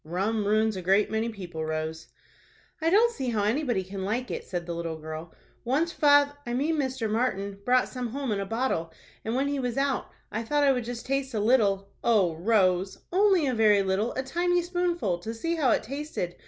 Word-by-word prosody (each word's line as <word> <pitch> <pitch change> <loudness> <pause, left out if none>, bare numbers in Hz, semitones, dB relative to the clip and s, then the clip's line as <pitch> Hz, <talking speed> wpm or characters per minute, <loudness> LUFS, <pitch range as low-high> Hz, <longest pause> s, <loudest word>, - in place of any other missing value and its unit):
"Rum 200 +6 -1
ruins 215 0 +2
a 185 - -4
great 195 +4 +2
many 220 +1 0
people, 175 -7 -6
Rose." 155 0 -4 0.7
"I 325 - +2
don't 455 +6 +4
see 265 - -3
how 215 -3 0
anybody 235 -2 0
can 190 +1 -6
like 235 +6 -2
it," - - -4
said 175 -2 -4
the 170 - -4
little 165 -1 -4
girl. 160 +1 -7 0.3
"Once 295 +8 +1
fath—I 285 -4 +3
mean 305 +5 0
Mr. 260 -5 -1
Martin, 200 -3 -1
brought 255 0 +3
some 250 -1 -4
home 265 +1 -3
in 205 - 0
a 195 - -2
bottle, 225 -8 -1 0.3
and 225 +2 -2
when 270 +2 +1
he 285 -1 -1
was 245 -1 -2
out, 275 -1 0 0.2
I 220 - -2
thought 290 +6 +1
I 280 - +5
would 250 -3 -1
just 240 0 -6
taste 270 -1 -2
a - - +1
little—" 205 -4 +2
"O 205 -8 +3
Rose!" 185 0 +2 0.2
"Only 380 -4 +4
a 260 - +1
very 210 -3 +4
little, 195 +5 0
a 260 - -2
tiny 350 +5 +1
spoonful, 345 - -1
to 220 +6 -6
see 330 +9 -2
how 305 -6 +2
it - - +2
tasted. 275 - -4
230 Hz, 210 wpm, -27 LUFS, 195-275 Hz, 0.7 s, I